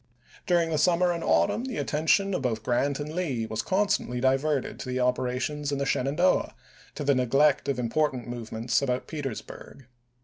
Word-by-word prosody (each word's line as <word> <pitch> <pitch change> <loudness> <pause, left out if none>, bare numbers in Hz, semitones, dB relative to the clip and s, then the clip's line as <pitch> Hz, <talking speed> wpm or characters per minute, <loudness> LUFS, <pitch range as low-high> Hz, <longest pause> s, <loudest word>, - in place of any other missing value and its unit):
During 170 -2 +2
the 155 - +1
summer 175 +3 +3
and 170 -1 -3
autumn 85 - +2
the 255 -4 -5
attention 175 +6 +1
of - - -1
both 115 -4 -2
Grant 135 +5 0
and 150 +1 -5
Lee 140 -10 -2
was 110 0 -3
constantly 190 -10 0
diverted 135 +2 0
to - - -6
the 125 0 -1
operations 125 +4 -1
in 140 - -1
the 140 - -1
Shenandoah 145 +8 +1 0.4
to - - -4
the 140 0 +3
neglect 135 +4 +2
of 135 - 0
important 125 +1 -1
movements 115 0 -2
about 125 -2 -1
Petersburg. 135 -2 -7
140 Hz, 170 wpm, -27 LUFS, 125-155 Hz, 0.4 s, summer